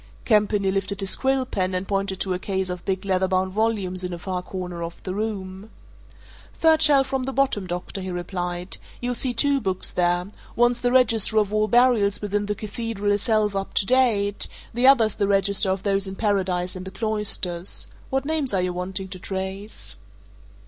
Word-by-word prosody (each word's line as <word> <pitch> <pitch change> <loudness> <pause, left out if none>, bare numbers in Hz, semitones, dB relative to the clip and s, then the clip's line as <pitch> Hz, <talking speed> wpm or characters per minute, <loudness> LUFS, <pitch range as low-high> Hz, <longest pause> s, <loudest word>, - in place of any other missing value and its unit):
Campany 210 -3 +3
lifted 195 +1 -2
his 195 -1 +2
quill 265 -1 +1
pen 185 -5 -1
and 185 +1 -2
pointed 195 -1 -1
to 190 - 0
a 180 - -2
case 190 -1 -2
of 180 -1 -6
big 190 0 -2
leather 190 -1 +1
bound 185 0 0
volumes 200 -4 -1
in 180 0 -3
a - - -4
far 180 +1 -3
corner 180 -2 -6
of 170 0 -7
the 185 - -4
room. 200 -1 -4 0.9
"Third 320 -1 +4
shelf 285 -3 +6
from 265 -1 -2
the 270 - -2
bottom, 260 -8 0
doctor," 180 +2 -4
he 185 - -5
replied. 175 0 -4 0.2
"You'll 245 0 -2
see 250 +1 +1
two 275 +3 +3
books 190 -3 -1
there 175 0 +1 0.3
one's 240 0 +3
the 245 - +1
register 225 -4 +4
of 210 -1 +2
all 215 0 +2
burials 230 -3 +3
within 205 0 -2
the 210 - -1
Cathedral 210 0 -3
itself 210 -1 +1
up 195 0 -4
to - - +3
date: 215 -5 +2 0.3
the 245 +3 +3
other's 230 -6 +6
the 200 - 0
register 200 0 +2
of 190 0 -1
those 195 -1 +1
in 190 - -6
Paradise 190 -4 0
and 185 - -6
the 190 - -6
cloisters. 195 -4 -1 0.2
What 270 0 -1
names 295 -7 -1
are 185 - +2
you 180 0 -1
wanting 185 +2 -3
to 185 -1 -7
trace?" 190 +3 -5
200 Hz, 190 wpm, -24 LUFS, 185-225 Hz, 0.9 s, shelf